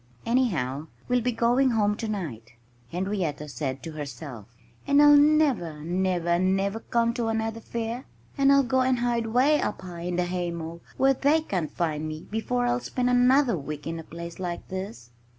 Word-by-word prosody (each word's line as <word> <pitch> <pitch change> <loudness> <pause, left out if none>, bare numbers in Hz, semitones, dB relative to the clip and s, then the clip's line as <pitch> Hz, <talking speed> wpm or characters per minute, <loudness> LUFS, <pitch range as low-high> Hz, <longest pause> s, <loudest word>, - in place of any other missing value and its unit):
"Anyhow, 160 - 0 0.2
we'll 245 0 +2
be 250 +2 0
going 240 +3 +3
home 210 -3 +2
tonight," 165 - -5 0.4
Henrietta 180 -5 -2
said 135 -3 -4
to 165 - -6
herself. 140 -6 -7 0.4
"And 280 0 +4
I'll 295 0 +8
never, 285 - +3
never, 175 0 0
never 195 +3 +1
come 235 0 0
to 235 -2 -2
another 225 0 -1
fair. 235 +2 -4 0.3
I'll 275 0 +5
go 260 0 +1
and 255 0 +2
hide 235 -1 0
'way 265 +7 +3
up 205 - -3
high 175 -2 -8
in 175 +1 -2
the 180 0 +1
haymow 170 -2 -4 0.2
where 270 +1 +4
they 290 +4 +2
can't 180 - -2
find 155 -2 -2
me 155 +1 -6
before 245 +3 -1
I'll 245 0 +1
spend 250 0 -1
another 250 0 +4
week 150 -1 -6
in 165 0 -4
a - - -7
place 170 +2 -8
like 175 -2 -5
this." 155 - -6
200 Hz, 170 wpm, -26 LUFS, 165-245 Hz, 0.4 s, I'll